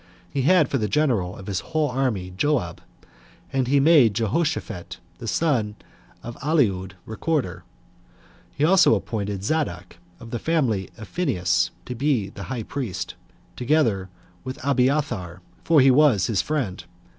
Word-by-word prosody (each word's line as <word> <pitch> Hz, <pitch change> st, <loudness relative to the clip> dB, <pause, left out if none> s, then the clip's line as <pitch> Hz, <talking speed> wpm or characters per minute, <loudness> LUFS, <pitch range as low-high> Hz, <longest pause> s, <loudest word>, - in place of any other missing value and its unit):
He 140 Hz, -, 0 dB
had 155 Hz, +2 st, +4 dB
for 135 Hz, -, -1 dB
the 105 Hz, -, 0 dB
general 110 Hz, -9 st, +1 dB
of 95 Hz, -, -10 dB
his 95 Hz, -3 st, -2 dB
whole 155 Hz, -, -1 dB
army 120 Hz, -9 st, -1 dB
Joab; 145 Hz, +5 st, 0 dB, 0.7 s
and 130 Hz, -2 st, +1 dB
he 140 Hz, +2 st, +3 dB
made 135 Hz, -8 st, +5 dB
Jehoshaphat, 115 Hz, -, -2 dB, 0.2 s
the -, -, -7 dB
son 120 Hz, -10 st, 0 dB, 0.5 s
of 120 Hz, 0 st, -7 dB
Ahilud, 105 Hz, -, +1 dB
recorder. 125 Hz, -, -2 dB, 0.9 s
He 145 Hz, -, +2 dB
also 180 Hz, -8 st, +5 dB
appointed 100 Hz, -2 st, -3 dB
Zadok, 100 Hz, -, -2 dB, 0.2 s
of 115 Hz, -1 st, -11 dB
the 120 Hz, -, -2 dB
family 120 Hz, -, 0 dB
of 110 Hz, -3 st, -9 dB
Phinehas, 90 Hz, -, 0 dB, 0.2 s
to 125 Hz, -, -5 dB
be 125 Hz, -6 st, 0 dB
high 115 Hz, +4 st, -5 dB
priest, 100 Hz, -9 st, -4 dB, 0.4 s
together 120 Hz, -8 st, +1 dB, 0.3 s
with 130 Hz, 0 st, -6 dB
Abiathar, 125 Hz, -, 0 dB, 0.2 s
for 160 Hz, -4 st, +5 dB
he 135 Hz, 0 st, +6 dB
was 130 Hz, -, +4 dB
his 110 Hz, -5 st, +1 dB
friend. 135 Hz, -12 st, -2 dB
125 Hz, 140 wpm, -24 LUFS, 100-145 Hz, 0.9 s, he